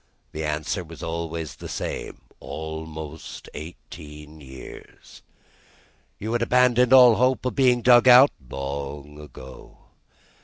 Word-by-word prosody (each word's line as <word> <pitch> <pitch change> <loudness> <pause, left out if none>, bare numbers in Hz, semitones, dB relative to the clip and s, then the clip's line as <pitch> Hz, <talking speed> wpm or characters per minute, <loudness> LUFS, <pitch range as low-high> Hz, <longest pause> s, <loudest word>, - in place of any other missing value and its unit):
The 80 - -5
answer 75 +5 -3
was 85 -1 -12
always 85 -1 -5
the - - -9
same: - - -6 0.2
"Almost 80 -1 -8
eighteen 75 -1 -11
years." 65 -2 -13 1.0
"You 110 +3 -5
had 120 - 0
abandoned 125 0 +3
all 125 -4 +7
hope 130 +1 +1
of 125 - -1
being 125 -3 +2
dug 120 0 +6
out?" 130 +3 +8 0.2
"Long 70 +2 -6
ago." 65 -3 -13
80 Hz, 115 wpm, -24 LUFS, 75-120 Hz, 1.0 s, out